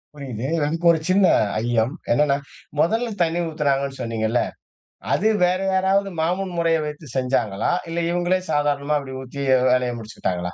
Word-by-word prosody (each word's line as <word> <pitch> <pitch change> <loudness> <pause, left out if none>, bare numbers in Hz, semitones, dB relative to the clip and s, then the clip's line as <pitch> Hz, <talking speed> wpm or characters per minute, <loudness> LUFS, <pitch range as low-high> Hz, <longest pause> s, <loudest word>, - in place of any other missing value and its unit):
புரியுது. 130 -3 -5 0.2
எனக்கு 165 +3 -2
ஒரு 160 - +1
சின்ன 190 +1 +5 0.4
ஐயம். 120 +2 +1 0.2
என்னன்னா, 140 +2 +3 0.4
மொதல்ல 225 +8 +2
தண்ணி 165 +1 -1
ஊத்துனாங்கன்னு 140 -3 -1
சொன்னீங்கள்ல. 115 0 0 0.7
அது 215 - +2 0.2
வேற 180 +1 +1
யாராவது 195 +1 +2
மாமன் 180 +2 -1
முறையை 165 -1 +2
வைத்து 150 0 -7
செஞ்சாங்களா? 125 - 0 0.2
இல்ல 170 +1 -2
இவங்களே 175 +1 +1
சாதாரணமா 145 0 +1
அப்டி 130 -1 -8
ஊத்தி 135 +2 -7 0.3
வேலயை 125 -1 +2
முடிச்சுகிட்டாங்களா? 90 -5 -4
145 Hz, 135 wpm, -22 LUFS, 125-175 Hz, 0.7 s, சின்ன